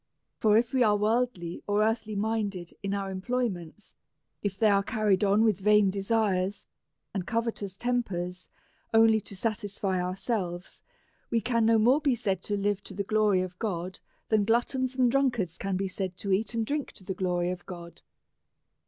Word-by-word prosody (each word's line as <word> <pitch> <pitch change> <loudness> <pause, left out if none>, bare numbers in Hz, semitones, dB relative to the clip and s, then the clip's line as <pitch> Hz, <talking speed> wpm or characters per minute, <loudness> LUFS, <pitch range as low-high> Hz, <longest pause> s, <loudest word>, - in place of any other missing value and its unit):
For, 215 -1 +5
if 235 +3 +1
we 260 - +2
are 210 -3 +4
worldly 210 -5 0
or 205 +1 +2
earthly 220 -1 -1
mind 210 -1 -1
ed 175 -1 -7
in 200 0 -2
our 195 -1 -3
employments^ 195 -4 -3 0.5
if 200 -2 -2
they 220 - +4
are 200 0 +4
carried 210 -3 +1
on 205 +2 +4
with 215 -4 +2
vain 210 -1 +4
desires 200 -1 0 0.5
and 190 -3 -3
covetous 225 -4 -2
tempers, 185 -8 -2 0.5
only 225 -1 +6
to 200 - -10
satisfy 205 -3 -2
our 180 +1 -2
selves, 190 -4 -3 0.5
we 230 - +2
can 230 -1 +1
no 225 0 +5
more 250 +7 +4
be 280 -4 +2
said 195 -5 -1
to 205 - -1
live 200 0 0
to - - -8
the 200 - -1
glory 210 -2 +2
of 180 -1 -8
God 185 -4 -3 0.3
than 215 -2 +3
gluttons 250 +4 +1
and 250 -2 +3
drunkards 235 -11 0
can 195 -1 -1
be 195 +1 -1
said 185 -1 -4
to 200 - -3
eat 210 +4 +1
and 225 -1 0
drink 290 +3 -2
to - - -15
the 190 - -3
glory 180 -1 0
of 180 -1 -6
God. 170 -2 -9
205 Hz, 180 wpm, -28 LUFS, 190-225 Hz, 0.5 s, only